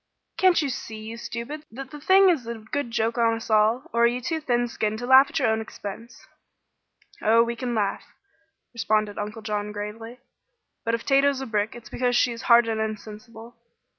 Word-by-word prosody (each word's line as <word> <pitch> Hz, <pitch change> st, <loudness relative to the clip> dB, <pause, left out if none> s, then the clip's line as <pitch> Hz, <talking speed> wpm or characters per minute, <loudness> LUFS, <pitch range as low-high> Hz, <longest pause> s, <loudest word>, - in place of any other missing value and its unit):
"Can't 365 Hz, -4 st, +4 dB
you 285 Hz, -, -1 dB
see, 225 Hz, -3 st, -6 dB
you 220 Hz, +1 st, -7 dB
stupids, 240 Hz, +6 st, -6 dB
that 265 Hz, +3 st, -8 dB
the 295 Hz, -, -9 dB
thing 380 Hz, +5 st, +5 dB
is 285 Hz, -10 st, 0 dB
a 235 Hz, -, -4 dB
good 235 Hz, +5 st, -4 dB
joke 230 Hz, +1 st, -1 dB
on 230 Hz, -1 st, +3 dB
us 225 Hz, 0 st, -7 dB
all? 220 Hz, +4 st, +3 dB
Or 235 Hz, 0 st, +4 dB
are -, -, +6 dB
you 240 Hz, +1 st, -1 dB
too 320 Hz, +5 st, -3 dB
thin 245 Hz, -4 st, 0 dB
skinned 215 Hz, -2 st, -2 dB
to 245 Hz, -, -5 dB
laugh 265 Hz, +2 st, +7 dB
at -, -, -4 dB
your -, -, +2 dB
own 220 Hz, 0 st, 0 dB
expense?" 220 Hz, +2 st, -9 dB, 1.0 s
"Oh, 230 Hz, +2 st, +5 dB
we 235 Hz, 0 st, -3 dB
can 245 Hz, -1 st, -3 dB
laugh," 205 Hz, -2 st, -1 dB, 0.7 s
responded 215 Hz, -3 st, 0 dB
Uncle 210 Hz, +2 st, -6 dB
John, 210 Hz, -1 st, -3 dB
gravely. 220 Hz, +4 st, -7 dB, 0.6 s
"But 230 Hz, 0 st, +1 dB
if 230 Hz, -, -7 dB
Tato's 275 Hz, 0 st, +3 dB
a 265 Hz, -, -4 dB
brick 215 Hz, -2 st, -1 dB
it's 240 Hz, 0 st, -11 dB
because 245 Hz, -1 st, 0 dB
she 240 Hz, -, +3 dB
is 230 Hz, 0 st, -7 dB
hard 235 Hz, 0 st, +7 dB
and 220 Hz, -1 st, -1 dB
insensible. 220 Hz, +2 st, -7 dB
230 Hz, 200 wpm, -25 LUFS, 220-250 Hz, 1.0 s, laugh